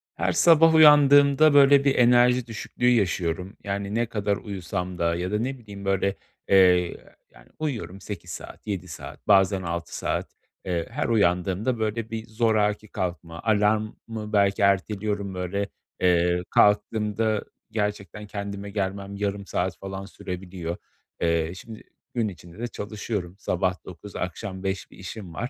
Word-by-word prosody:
Her - - 0
sabah 165 -1 +6
uyandığımda 145 -1 +7
böyle 140 0 +7
bir 140 - +3
enerji 125 0 +4
düşüklüğü 120 +2 -1
yaşıyorum, 95 -4 0
yani 100 0 -3
ne 120 +1 +2
kadar 105 -3 -1
uyusam 90 -2 -5
da 85 0 +1
ya 90 +2 -3
da 105 - 0
ne 130 +3 -2
bileyim 100 -4 -10
böyle, 95 0 +1 0.3
eee, 90 -2 +5 0.4
yani, - - -19
uyuyorum 120 - -4
8 90 -4 -7
saat, - - -9
7 95 -3 -3
saat, 80 - -10
bazen 95 -1 +4
6 85 -1 -4
saat, - - -2 0.4
eee, 85 -2 -2
her - - -2
uyandığımda 100 +2 +1
böyle 110 +1 -2
bir 115 0 -5
zoraki 110 -2 +1
kalkma, 85 -3 -5
alarmı 110 0 0
belki 100 0 +3
erteliyorum 100 0 0
böyle, 95 +2 -2 0.3
eee, 90 -1 +3
kalktığımda 105 +1 +2 0.3
gerçekten 105 -1 -3
kendime 100 0 -5
gelmem 100 0 -3
yarım 100 0 -3
saat - - -2
falan 95 0 -6
sürebiliyor. 90 -3 -6 0.4
Eee, 85 -1 +1
şimdi 110 +3 -10 0.3
gün 115 -3 0
içinde 90 -1 -10
de 120 - -2
çalışıyorum, 105 -4 -5
sabah 90 -2 -1
9 95 +3 -11
akşam 95 +2 -5
5 95 -1 -3
bir - - -15
işim 95 -1 -8
var. 120 +9 -4
100 Hz, 145 wpm, -25 LUFS, 90-110 Hz, 0.4 s, uyandığımda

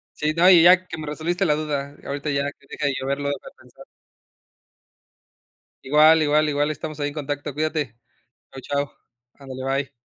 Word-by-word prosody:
Sí, 150 +1 -1
no, 175 +2 +6
y 175 -3 +8
ya 185 +1 +6
que 165 - -7
me 155 -1 -7
resolviste 170 +5 -1
la 150 -4 +2
duda 145 -2 -4
ahorita 145 +2 -4
ya 140 -1 0
que 140 - -26
deje 145 - -2
de 140 - 0
yo 130 - -5
verlo 140 +1 -1
y - - 0
de 140 - -7
pensar. - - -17 2.0
Igual, 155 +3 +5
igual, 150 0 +2
igual. 145 +1 0
Estamos 155 0 -7
ahí 145 - -1
en - - -10
contacto. 145 0 -4
Cuídate. 150 -5 -2 0.5
Chao, 135 - -10 0.2
chao. - - -23 0.4
Ándale, 130 -2 -9 0.2
bye. 135 - -21
150 Hz, 185 wpm, -23 LUFS, 140-155 Hz, 2.0 s, y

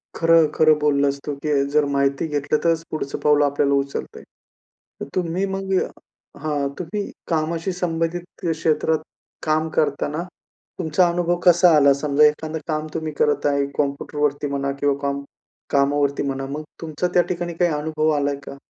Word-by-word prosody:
खरं-खरं 160 -2 +4
बोललास 140 -1 +2
तू 145 - -3
की 145 -2 +2
जर 150 -1 +4
माहिती 140 +2 +1
घेतलं, 150 0 0
तरच 165 -1 +2
पुढचं 155 -3 -4
पाऊल 150 0 +4
आपल्याला 140 0 +1
उचलतंय. 140 0 -3 0.8
तर - - -2
तुम्ही 180 +1 0
मग 195 0 -3 0.7
हां. 145 -2 0
तुम्ही 185 +4 -3 0.2
कामाशी 165 +2 -1
संबंधित 175 -1 -2 0.3
क्षेत्रात 160 0 +1 0.5
काम 155 +1 +1
करतांना, 150 +2 0 0.6
तुमचा 175 +1 +3
अनुभव 175 0 0
कसा 175 -1 +6
आला? 140 -1 +6
समजा 140 +1 +3
एखादं 155 +1 0
काम 155 -1 -2
तुम्ही 160 -1 -3
करत 150 - +2
आहे, 140 -1 +1
कॉम्प्युटरवरती 145 0 -1
म्हणा 140 0 -2
किंवा 145 -1 +2
काम 140 0 -2 0.5
कामावरती 140 0 +2
म्हणा, 135 -1 -3
मग 150 +2 -4 0.2
तुमचा 165 +2 -2
त्या 175 - +6
ठिकाणी 175 -1 -3
काही 175 +1 +1
अनुभव 155 +1 0
आलाय 145 0 0
का? 140 - -8
150 Hz, 150 wpm, -22 LUFS, 140-165 Hz, 0.8 s, कसा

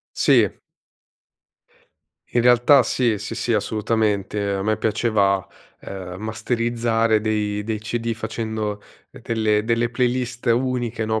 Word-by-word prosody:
Sì. - - +4 1.8
In 120 - +1
realtà 125 +3 +6
sì, 120 -3 0
sì, - - -6
sì - - -1
assolutamente. 105 -2 0
A 95 - -2
me 110 +1 +1
piaceva, 105 -3 +1 0.3
ehm, 95 -2 -7
masterizzare 115 0 0
dei 105 -1 -1
dei 110 0 -2
CD 115 +1 -2
facendo 110 -2 -4 0.3
ehm, - - -14
delle 110 -2 +1
delle 115 +1 +1
playlist 125 0 -1
uniche, 120 -2 0
no, 110 0 0
110 Hz, 120 wpm, -22 LUFS, 105-120 Hz, 1.8 s, realtà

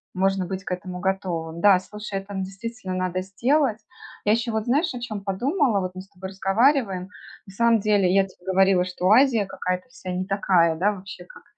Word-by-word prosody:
можно 195 0 +1
быть 190 +1 -5
к - - -7
этому 180 0 -5
готовым. 175 -4 -2
Да, 195 -2 +6
слушай, 210 +1 -6
это, 195 +1 -10
ну, 190 -1 -2
действительно 195 0 -6
надо 185 0 -1
сделать. 230 +6 +1 0.5
Я 210 - +4
еще 230 +1 -1
вот, 220 -1 -2
знаешь, 285 +7 +1
о 250 - -5
чем 215 -4 -5
подумала: 240 - +1
вот 185 0 -3
мы 185 - -6
с 195 - -17
тобой 190 -1 -8
разговариваем, 195 0 +1 0.4
на 195 - -12
самом 230 +2 +3
деле, 200 -3 +2
я 195 0 +4
тебе 185 -2 -19
говорила, 190 -1 +3
что 180 0 -1
Азия 235 -3 +5
какая-то 185 +1 -3
вся 250 -8 -8
не 180 +1 -2
такая, 185 -4 +2
да, 190 +6 +2
вообще, 195 0 -10
как - - -16
195 Hz, 200 wpm, -24 LUFS, 185-220 Hz, 0.5 s, Да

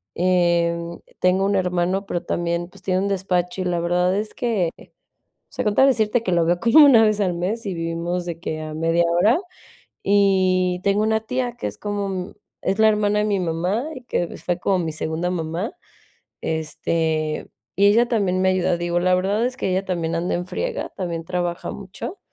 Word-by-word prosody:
Em, 170 -1 +1 0.2
tengo 185 +1 +3
un 200 0 +1
hermano, 180 +1 0
pero 175 -3 -2
también, 170 0 -2
pues, - - -16
tiene 185 -1 +1
un 200 - 0
despacho, 185 -1 -1
y - - -2
la 175 -1 0
verdad, 180 +2 +1
es 210 +1 -3
que 220 -10 0 0.8
o - - -23
sea, - - -2
con 210 -1 +1
tal 265 - +5
de - - +6
decirte, 225 -1 +1
que 185 - -1
lo 170 -1 +3
veo 175 +1 +1
como 290 +6 +7
1 240 -6 +7
vez 215 -1 +2
al 185 -3 +1
mes, 200 +7 -2
y 195 - -2
vivimos 170 +2 -2
de 170 -2 -5
que 155 -2 -4
a 155 0 -6
media 165 +2 +1
hora. 180 +8 +4 0.7
Y, 185 -2 +3
tengo 200 +1 +2
una 220 0 +2
tía, 245 +1 -2
que 105 - -3
es 105 0 -7
como 200 - -4 0.3
es 195 +3 -1
la 220 - +6
hermana 210 -1 +1
de 210 - +1
mi 205 -2 +1
mamá, 180 - -1
y 255 - -9
que 175 -7 -2
fue 175 -1 -2
como 190 +1 +1
mi 165 -2 -2
segunda 160 +2 -2
mamá, 170 +4 -3 0.7
este, 160 0 -1 0.3
y 200 - +4
ella 230 +4 +4
también 195 -6 +1
me 190 - +3
ayuda. 180 -2 +1
Digo, 175 0 0
la 180 +1 +2
verdad, 200 +5 +1
es 255 +1 -3
que 195 - -1
ella 190 +1 0
también 170 -3 -2
anda 170 +2 -1
en 175 +1 -3
friega, - - -3
también 170 -3 -3
trabaja 175 -1 -3
mucho. 200 - -8
185 Hz, 200 wpm, -22 LUFS, 170-205 Hz, 0.8 s, como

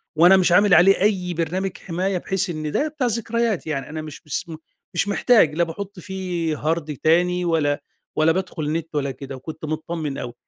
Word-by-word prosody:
وأنا 175 +4 +7
مش 185 -1 +3
عامل 200 +2 +5
عليه 185 +4 +6
أي 190 -3 +1
برنامج 175 +4 -2
حماية، 185 +2 -2
بحيث 190 +2 -2
إن 155 -2 -3
ده 295 - +1
بتاع 295 -4 -1
ذكريات 230 -4 -1
يعني، 140 -4 -3
أنا 155 +1 -5
مش 155 -2 -9
مس 150 +4 -3 0.5
مش 175 - 0
محتاج، 205 -7 +4
لا 170 - +3
باحُطّ 190 +4 -6
فيه 180 -4 -3
هارد 155 -1 -2
تاني، 180 +4 +2
ولا، 150 -4 +1 0.3
ولا 155 +1 +4
بادخل 165 -4 -2
نت 160 0 -4
ولا 140 -2 0
كده، 135 +1 -8
وكنت 155 +4 -8
متطمن 155 -2 -3
أوي، 120 - -5
170 Hz, 185 wpm, -22 LUFS, 155-190 Hz, 0.5 s, وأنا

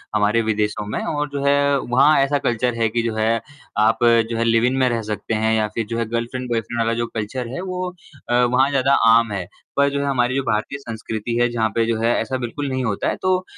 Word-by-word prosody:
हमारे 105 +2 +2
विदेशों 105 -1 -1
में 105 - -3
और 150 -1 -2
जो 140 -1 -4
है 140 0 +3
वहाँ 130 +5 +3
ऐसा 140 +1 +1
कल्चर 120 -1 0
है 115 - +3
कि 115 +2 0
जो 115 -2 -2
है 110 +1 +1 0.4
आप 110 +2 +3 0.3
जो 115 - -2
है 115 - +1
लिव-इन 115 +2 +2
में 130 -1 +3
रह 115 -1 -1
सकते 105 +1 -4
हैं 110 0 +1
या 110 -1 +1
फ़िर 110 +1 -4
जो 115 - -2
है 115 - 0
गर्लफ़्रेंड 120 +2 -3
बॉयफ़्रेंड 115 0 -2
वाला 115 0 +1
जो 120 0 -1
कल्चर 115 +3 -4
है 175 - -4
वो 185 -1 -3 0.4
अ, - - +1
वहाँ 125 +2 +3
ज़्यादा 135 -1 +2
आम 115 -1 +5
है, 95 -3 -3 0.3
पर 140 0 +4
जो 140 0 -2
है - - -1
हमारी 130 -2 +1
जो 135 - 0
भारतीय 110 +3 -1
संस्कृति 115 -2 -5
है 120 0 +3
जहाँ 110 -2 0
पे 115 - +2
जो 115 0 0
है 115 +1 +2
ऐसा 130 - -2
बिल्कुल 130 +4 -4
नहीं 130 -1 -2
होता 105 -4 -1
है, - - -1
तो 185 0 0
120 Hz, 245 wpm, -21 LUFS, 110-135 Hz, 0.4 s, आम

